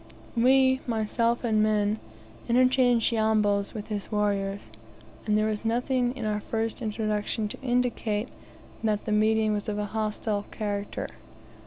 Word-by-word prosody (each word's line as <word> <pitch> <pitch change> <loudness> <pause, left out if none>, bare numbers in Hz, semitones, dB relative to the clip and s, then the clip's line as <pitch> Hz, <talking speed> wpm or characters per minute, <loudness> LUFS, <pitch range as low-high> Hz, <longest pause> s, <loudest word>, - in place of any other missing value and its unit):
We, 260 +2 +4
myself 230 +1 0
and 220 -3 +2
men, 215 0 +2 0.5
interchanged 250 -1 +4
"Yambos" 215 -2 +1
with 210 0 -6
his 205 -1 -4
warriors; 200 -1 0 0.7
and 210 0 +3
there 215 - +2
was 215 -1 -2
nothing 245 +2 0
in 235 - -4
our 210 -1 0
first 225 +2 -3
introduction 215 -1 -1
to - - -9
indicate 245 -3 0 0.5
that 215 -2 0
the 215 - -2
meeting 215 0 +3
was 205 0 -2
of 205 - -2
a 210 - -1
hostile 215 -1 -2
character. 205 -1 -3
215 Hz, 140 wpm, -27 LUFS, 210-235 Hz, 0.7 s, We